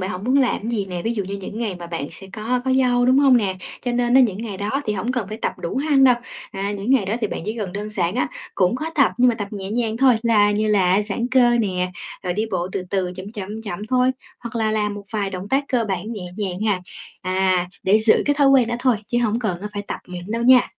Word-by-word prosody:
Bạn 185 +1 -2
hổng 185 0 -5
muốn 255 +3 +2
làm 265 -3 +2
cái 225 - -3
gì 210 -4 -1
nè, 180 -2 -5
ví 230 +1 -1
dụ 205 -3 -2
như 195 +2 -4
những 200 +2 -7
ngày 220 -5 -2
mà 175 -1 -8
bạn 165 -4 -4
sẽ 195 - -8
có 225 +4 -1
có 260 - +1
dâu, 245 -2 +3
đúng 260 +1 +5
hông 275 -3 +6
nè? 195 -5 0 0.3
Cho 245 - -1
nên 240 0 +1
á, 265 - +8
những 220 -7 +3
ngày 205 -4 -5
đó 205 +2 -3 0.2
thì 210 - +1
hổng 215 +5 -2
cần 235 -7 -2
phải 215 - -5
tập - - -2
đủ 170 - -4
hăng 280 -1 +3
đâu. 255 -2 +7 0.4
À, 200 +1 -3
những 205 +4 -3
ngày 265 -6 +4
đó 195 +3 -1
thì 215 - +1
bạn - - -5
chỉ 215 +3 -3
cần 195 -4 -3
đơn 205 +2 -4
giản 185 -3 0
á, 250 - +1 0.3
cũng 185 +3 +2
có 310 - -4
tập 275 - +4
nhưng 250 0 +5
mà 235 - +2
tập 205 -3 -5
nhẹ 195 -2 -6
nhàng 225 -1 0
thôi, 260 0 +5
là 215 -3 +4
như 215 +1 0
là 195 -1 +3
giãn 210 +3 -2
cơ 245 -2 +5
nè, 185 -4 0 0.3
rồi 180 -2 -1
đi 215 +4 -1
bộ 180 -2 -1
từ - - -2
từ 185 -2 -1
chậm, 190 +3 -8
chậm, 210 +1 -6
chậm 190 -5 -5
thôi, 255 0 +3 0.3
hoặc 235 -1 -7
là 220 -1 +1
làm 210 -1 0
một 205 0 -8
vài 205 -3 -1
động 185 +1 -6
tác 275 +4 +1
cơ 245 -4 +1
bản 195 +4 -3
nhẹ 200 -5 -6
nhàng 190 -3 -3
ha. 210 -4 +1 0.4
À, 185 -1 +1
để 200 +3 +4
giữ 220 0 +4
cái 290 - +3
thói 280 -1 +4
quen 265 -4 +5
đó 240 - -1
thôi 250 -2 +2
chứ 240 - 0
hổng 230 -1 +1
cần, 195 -7 -2
á, 210 - -5
phải 205 -1 -4
tập - - -5
mịn 180 -1 -7
đâu 230 +1 -1
nha. 250 +1 +6
215 Hz, 285 wpm, -21 LUFS, 195-245 Hz, 0.4 s, á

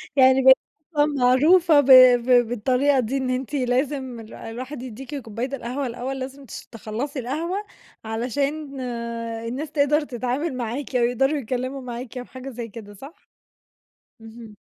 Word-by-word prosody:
يعني 260 0 +6
بقيتِ 265 0 +9 0.4
أصلًا 295 0 +4
معروفة 295 +4 +4
ب 285 - +2 0.4
ب 245 -2 +4
بالطريقة 255 +4 +1
دي، 255 +3 -1
إن 260 -1 -2
أنتِ 255 +2 -3
لازم 260 -1 -1
الو 220 0 -11
الواحد 255 +4 -7
يديكِ 260 +4 -8
كوباية 250 +2 -4
القهوة 255 +2 -4
الأول 250 +3 -5
لازم 270 +1 -7
تش - - -9
تخلّصي 240 +5 -5
القهوة، 320 +10 -3 0.5
علشان 275 +5 -3 0.7
الناس 275 +6 -5
تقدر 295 +1 +2
تتعامل 260 +3 -3
معاكِ، 250 +3 -4
أو 240 - +3
يقدروا 270 +5 +1
يتكلّموا 255 +2 -3
معاكِ 245 0 -7
أو 245 - -5
حاجة 260 +1 -9
زي 240 -2 -6
كده، 205 -1 -11
صح؟ 280 - -14 0.9
اهم. 225 -1 -12
260 Hz, 145 wpm, -23 LUFS, 240-280 Hz, 0.9 s, بقيتِ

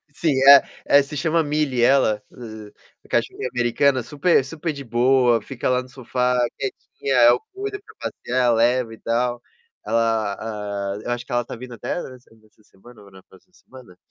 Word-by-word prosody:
sim, 160 -3 0 0.2
é 140 -1 +10 0.2
é, 140 - +6
se 140 +1 -7
chama 165 +1 +1
Millie 145 -4 -1
ela, 120 -5 +3
ah, 110 -3 -10 0.4
cachorrinha 130 - -1
americana 125 +2 +2
super 145 +4 +2
super 160 +3 -4
de 140 -1 -8
boa, 120 0 +2
fica 130 -2 -4
lá 125 0 +2
no 130 - -14
sofá 125 0 -1 0.2
quietinha. 135 0 -4
É, 120 0 +7
eu 120 - +3
cuido 410 +1 -5
pra - - -18 0.2
passear, 125 -1 0
levo 120 +1 +2
e - - -13
tal. 120 +1 -1 0.4
Ela 110 -2 0
ah, 105 -2 -4
eu 120 - -4
acho 120 0 -3
que - - -13
ela 120 0 0
tá - - -7
vindo 125 +1 -10
até - - -6
essa 130 - -8 0.3
essa 105 0 -28
semana 105 +3 -18
ou 100 -1 -17
na 95 -1 -16
próxima 95 - -23
semana. 125 - -16
125 Hz, 185 wpm, -22 LUFS, 115-135 Hz, 0.4 s, é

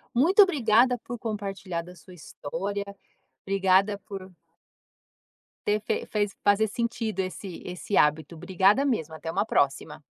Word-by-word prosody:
Muito 355 - +5
obrigada 250 - +3
por 240 0 -7
compartilhar 195 -5 -4
da 180 +1 -13
sua 180 +2 -15
história. 195 +6 -5 0.6
Obrigada 195 +1 +2
por 190 -2 -8 1.4
ter 210 +1 +2
fe - - -2
fez 205 -2 -1
fazer 205 +2 +3
sentido 230 -3 -3
esse 185 0 -6
esse 180 +2 -3
hábito. 150 +2 +2
Obrigada 195 - +2
mesmo, 160 - -1
até 160 +1 -7
uma 200 +4 0
próxima. 140 -3 0
200 Hz, 130 wpm, -26 LUFS, 180-220 Hz, 1.4 s, Muito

